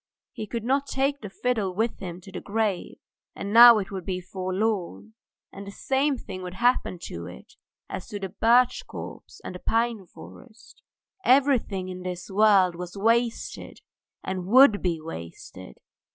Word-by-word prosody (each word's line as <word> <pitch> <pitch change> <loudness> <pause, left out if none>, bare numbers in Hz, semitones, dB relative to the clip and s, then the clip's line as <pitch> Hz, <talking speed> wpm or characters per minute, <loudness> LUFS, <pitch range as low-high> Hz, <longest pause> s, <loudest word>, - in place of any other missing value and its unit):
He 215 - -7
could 230 +1 -4
not 275 +3 0
take 275 +1 -1
the 205 - -7
fiddle 210 -4 -2
with 225 +3 -1
him 180 -2 -7
to 195 - -13
the - - -6
grave, 205 -3 -2 0.4
and 200 +1 -5
now 235 0 +10
it 200 -2 -4
would 190 -2 -5
be 185 +1 -3
left 180 - -17
forlorn, 195 +2 -2 0.4
and 200 0 -10
the - - -7
same 270 +5 0
thing 190 -5 -8
would 180 0 -7
happen 240 -3 +1
to 85 0 -7
it - - -13 0.3
as 185 - -7
to 205 - -6
the 195 -1 -5
birch 240 +5 +3
copse - - -9
and - - -7
the 180 - -8
pine 225 -3 -1
forest. 225 +4 -15 0.4
Everything 250 -8 +2
in 185 0 -7
this 180 +1 -6
world 195 -3 +4
was 180 +2 -8
wasted 230 +3 -1 0.4
and 185 -1 -4
would 240 -1 +6
be 170 -3 -1
wasted! 85 - -10
205 Hz, 165 wpm, -25 LUFS, 185-235 Hz, 0.4 s, now